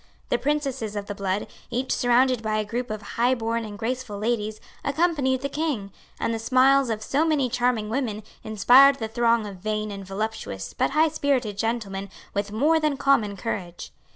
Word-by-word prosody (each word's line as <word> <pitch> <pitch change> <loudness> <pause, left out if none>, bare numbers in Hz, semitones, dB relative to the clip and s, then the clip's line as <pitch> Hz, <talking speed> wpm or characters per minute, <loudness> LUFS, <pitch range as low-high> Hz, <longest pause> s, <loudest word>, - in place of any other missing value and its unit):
The - - +1
princesses 270 -7 -1
of 205 -1 -3
the 205 - -5
blood, 200 0 -2 0.2
each 250 +2 -2
surrounded 245 0 +3
by 215 -1 -1
a 215 - 0
group 240 +4 -3
of 215 -1 -5
highborn 230 0 0
and 210 -2 -7
graceful 235 -1 -3
ladies, 215 0 -1 0.2
accompanied 280 -4 +1
the 280 - -1
King; 280 -9 -2 0.3
and 230 - 0
the 225 - -2
smiles 260 +3 +4
of 220 -1 -2
so 285 +7 +1
many 300 -6 +1
charming 240 -3 0
women 220 -3 -2 0.2
inspired 250 +6 +6
the 225 -4 -4
throng 230 0 +2
of 200 -2 -7
vain 215 +2 -2
and 195 -1 -6
voluptuous 195 - -4
but - - +1
highspirited 285 -7 +1
gentlemen 200 -3 -2 0.2
with 200 0 -2
more 300 +9 +3
than 305 -3 0
common 230 -8 +2
courage. 180 -4 -5
230 Hz, 175 wpm, -25 LUFS, 210-265 Hz, 0.3 s, inspired